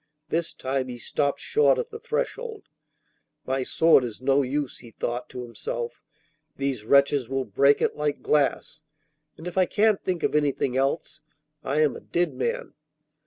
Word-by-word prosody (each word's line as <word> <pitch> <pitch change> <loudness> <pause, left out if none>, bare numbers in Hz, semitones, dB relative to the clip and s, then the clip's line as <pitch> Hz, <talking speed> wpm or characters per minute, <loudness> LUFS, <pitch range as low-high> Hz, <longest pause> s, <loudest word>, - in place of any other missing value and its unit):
This 165 0 0
time 130 0 -2
he 125 -1 -6
stopped 140 +3 -1
short 450 +4 +3
at 485 0 -3
the 450 - -7
threshold. 470 -1 -3 0.8
'My 130 +1 0
sword 160 +1 +4
is 115 -4 -5
no 135 +2 +3
use,' 140 +1 -2
he 120 - -12
thought 120 +2 -4
to 125 - -6
himself; 120 0 -5 0.6
'these 135 -5 -2
wretches 140 0 +4
will 135 -1 -1
break 140 +1 +3
it - - +1
like 150 -1 -2
glass, 150 +1 +1 0.6
and 160 - -11
if 180 +1 -1
I 185 - +4
can't 215 -1 +2
think 180 -2 -2
of - - +1
anything 140 -3 +1
else, 140 +3 -1 0.4
I 145 +3 +1
am 150 -2 +2
a - - -7
dead 175 -4 0
man. 130 - -3
140 Hz, 165 wpm, -26 LUFS, 130-165 Hz, 0.8 s, sword